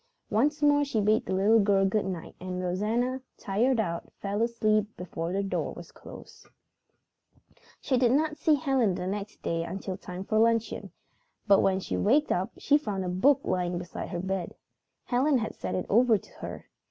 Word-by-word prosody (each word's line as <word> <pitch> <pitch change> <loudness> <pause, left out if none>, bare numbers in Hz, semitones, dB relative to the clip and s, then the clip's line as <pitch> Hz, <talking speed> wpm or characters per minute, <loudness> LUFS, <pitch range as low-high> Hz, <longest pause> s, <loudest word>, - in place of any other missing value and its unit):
Once 295 +7 +1
more 290 0 +5
she 275 -6 -1
bade 215 +2 +2
the - - -3
little 210 +4 +4
girl 200 -1 +3
good 205 +2 +1
night, 180 -4 -5
and 180 0 -5
Rosanna, 220 +8 -1 0.2
tired 230 +5 +1
out, 170 -5 -3
fell 200 +2 -2
asleep 215 -3 +2
before 170 -2 -4
the 195 +2 0
door 195 - -2
was - - -11
closed. - - -13 1.3
She 260 - 0
did 245 -2 +4
not 305 +3 +1
see 310 0 +3
Helen 265 - +1
the 180 - -4
next 200 +2 -5
day 165 0 -1
until 190 +1 -5
time 180 -1 -7
for 215 +2 +1
luncheon, 230 0 +1 0.5
but 200 -2 +5
when 190 -1 +2
she - - -3
waked 285 +9 +3
up 185 +2 0
she 290 +1 +3
found 200 -9 -3
a - - -2
book 265 +11 +3
lying 180 -1 -1
beside 175 0 -6
her 175 - -4
bed. 190 -1 -3 0.5
Helen 265 +3 +2
had 220 -2 -3
sent - - -4
it 185 - -2
over 230 +1 +4
to - - -16
her. - - -7
210 Hz, 185 wpm, -28 LUFS, 185-250 Hz, 1.3 s, more